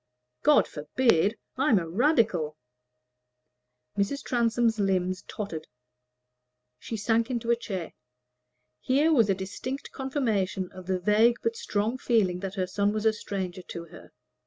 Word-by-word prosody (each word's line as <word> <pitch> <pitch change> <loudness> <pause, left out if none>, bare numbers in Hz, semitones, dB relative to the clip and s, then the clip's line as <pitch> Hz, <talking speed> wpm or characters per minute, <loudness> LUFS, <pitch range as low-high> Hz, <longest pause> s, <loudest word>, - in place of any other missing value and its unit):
"God 300 0 +5
forbid! 200 - +1 0.2
I'm 265 -4 +4
a 170 -3 -1
Radical." 185 - +2 1.4
Mrs. 205 +8 -1
Transome's 230 -2 +1
limbs 185 -1 +1
tottered; 170 -7 -5 1.1
she 225 - -5
sank 225 +3 +1
into 235 -2 -1
a - - +5
chair. 190 -7 -5 0.9
Here 290 +5 +3
was 230 -7 +4
a 195 - +3
distinct 205 +8 -5
confirmation 220 -9 -1
of 185 -1 -11
the 190 -1 +1
vague 215 +6 +4
but 460 0 0
strong 235 - -1
feeling 200 -8 +2
that 195 0 -5
her 185 -2 0
son 200 +2 0
was 215 0 -2
a 220 - +5
stranger 190 -4 -4
to 170 -1 -7
her. - - -13
210 Hz, 135 wpm, -27 LUFS, 185-240 Hz, 1.4 s, God